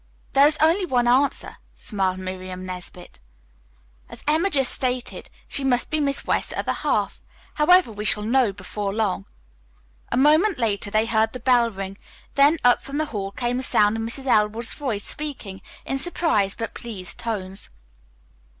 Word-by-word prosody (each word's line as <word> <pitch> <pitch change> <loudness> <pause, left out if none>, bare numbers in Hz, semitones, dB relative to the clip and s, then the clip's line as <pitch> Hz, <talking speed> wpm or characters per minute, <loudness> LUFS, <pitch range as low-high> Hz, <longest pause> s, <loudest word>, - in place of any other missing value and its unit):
"There 275 +1 +7
is 305 +1 +2
only 330 +5 +3
one 245 -8 +1
answer," 265 +3 +2 0.2
smiled 190 -3 -1
Miriam 185 0 -6
Nesbit. 180 - -8 0.9
"As - - -9
Emma 320 +6 +3
just 270 -7 +3
stated, 255 -1 -2 0.2
she 280 - -2
must 250 -2 +1
be 310 - 0
Miss 280 -1 0
West's - - 0
other - - -1
half. - - -1 0.3
However, 350 -2 +4
we 210 -1 -6
shall 210 +1 +1
know 240 0 +2
before 195 +1 -5
long." 205 - -1 0.9
A - - +1
moment 310 +9 +4
later 210 -4 0
they 215 +2 +2
heard 220 -1 +1
the 255 - -6
bell 245 -1 +3
ring, 195 -1 -7 0.3
then 285 +4 +5
up 245 0 +5
from 275 +1 -6
the 310 - +1
hall 195 -2 -3
came 240 +4 -2
the - - -2
sound 210 -4 +3
of 225 - -3
Mrs. 235 +4 -4
Elwood's 220 -1 +2
voice 240 -9 -3
speaking 245 -11 -5 0.2
in 270 - -1
surprised 265 - +1
but 225 - -4
pleased 200 -6 -6
tones. 195 -4 -4
235 Hz, 165 wpm, -23 LUFS, 200-275 Hz, 0.9 s, There